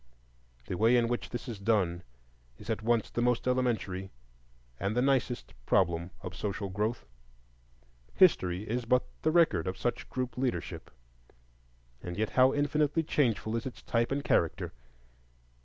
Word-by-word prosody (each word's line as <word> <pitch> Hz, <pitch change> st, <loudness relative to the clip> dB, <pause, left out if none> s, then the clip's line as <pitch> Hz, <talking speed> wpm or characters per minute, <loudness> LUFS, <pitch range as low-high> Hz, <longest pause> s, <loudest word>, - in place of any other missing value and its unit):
The 90 Hz, -, -4 dB
way 115 Hz, +3 st, +5 dB
in 120 Hz, -1 st, +3 dB
which 120 Hz, 0 st, -2 dB
this 120 Hz, -, -6 dB
is 115 Hz, -5 st, -5 dB
done 100 Hz, -5 st, +1 dB, 0.6 s
is 105 Hz, +2 st, -6 dB
at 110 Hz, -, -2 dB
once 115 Hz, 0 st, +1 dB
the 120 Hz, -, -1 dB
most 125 Hz, 0 st, +1 dB
elementary 115 Hz, -7 st, 0 dB, 0.7 s
and 100 Hz, +4 st, -1 dB
the -, -, +4 dB
nicest 130 Hz, -, 0 dB
problem 85 Hz, -1 st, +2 dB
of 90 Hz, -1 st, -6 dB
social 100 Hz, 0 st, -3 dB
growth. 105 Hz, +5 st, -2 dB, 1.1 s
History 90 Hz, +1 st, +4 dB
is 120 Hz, +2 st, -2 dB
but 125 Hz, +2 st, +3 dB, 0.2 s
the 155 Hz, -, +2 dB
record 155 Hz, -, +3 dB
of 95 Hz, -, -3 dB
such 120 Hz, -, -2 dB
group 125 Hz, -1 st, -3 dB
leadership; 120 Hz, -10 st, -3 dB, 1.1 s
and 90 Hz, 0 st, -6 dB
yet 110 Hz, 0 st, -1 dB
how 130 Hz, 0 st, +5 dB
infinitely 145 Hz, +2 st, +1 dB
changeful 115 Hz, -7 st, 0 dB
is 115 Hz, +2 st, -2 dB
its 130 Hz, -, -9 dB
type 115 Hz, +1 st, 0 dB
and 140 Hz, +1 st, -1 dB
character! 85 Hz, -, +1 dB
115 Hz, 150 wpm, -30 LUFS, 95-125 Hz, 1.1 s, way